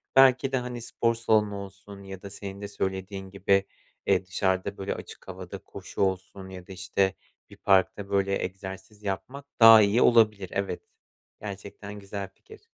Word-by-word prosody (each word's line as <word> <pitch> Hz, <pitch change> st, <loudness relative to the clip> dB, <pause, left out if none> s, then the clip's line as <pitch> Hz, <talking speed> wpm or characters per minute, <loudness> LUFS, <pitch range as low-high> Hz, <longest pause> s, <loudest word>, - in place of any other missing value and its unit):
Belki 135 Hz, 0 st, +6 dB
de, 135 Hz, -, +2 dB
hani, 125 Hz, -1 st, -4 dB
spor 115 Hz, 0 st, 0 dB
salonu 110 Hz, -3 st, +2 dB
olsun 100 Hz, 0 st, -9 dB
ya 95 Hz, -1 st, -9 dB
da 100 Hz, -, -8 dB
senin 100 Hz, 0 st, -7 dB
de 100 Hz, -, -4 dB
söylediğin 95 Hz, 0 st, -4 dB
gibi, 100 Hz, 0 st, +2 dB, 0.4 s
eee, 95 Hz, -1 st, +2 dB
dışarıda, 95 Hz, +1 st, -1 dB
böyle, 95 Hz, 0 st, -3 dB
açık -, -, -11 dB
havada -, -, -7 dB
koşu -, -, -8 dB
olsun 95 Hz, 0 st, -1 dB
ya 90 Hz, -1 st, -10 dB
da, 95 Hz, -, -8 dB
işte, 95 Hz, +1 st, 0 dB, 0.4 s
bir -, -, -14 dB
parkta, 100 Hz, +1 st, +2 dB
böyle, 100 Hz, 0 st, +1 dB
egzersiz 95 Hz, +2 st, -7 dB
yapmak 130 Hz, +8 st, -4 dB
daha 115 Hz, -1 st, +10 dB
iyi 105 Hz, +4 st, +3 dB
olabilir, 105 Hz, -5 st, +4 dB
evet. 100 Hz, -2 st, -2 dB, 0.6 s
Gerçekten 100 Hz, 0 st, -8 dB
güzel 100 Hz, 0 st, -6 dB
fikir. 435 Hz, +3 st, -16 dB
100 Hz, 160 wpm, -27 LUFS, 95-105 Hz, 0.6 s, daha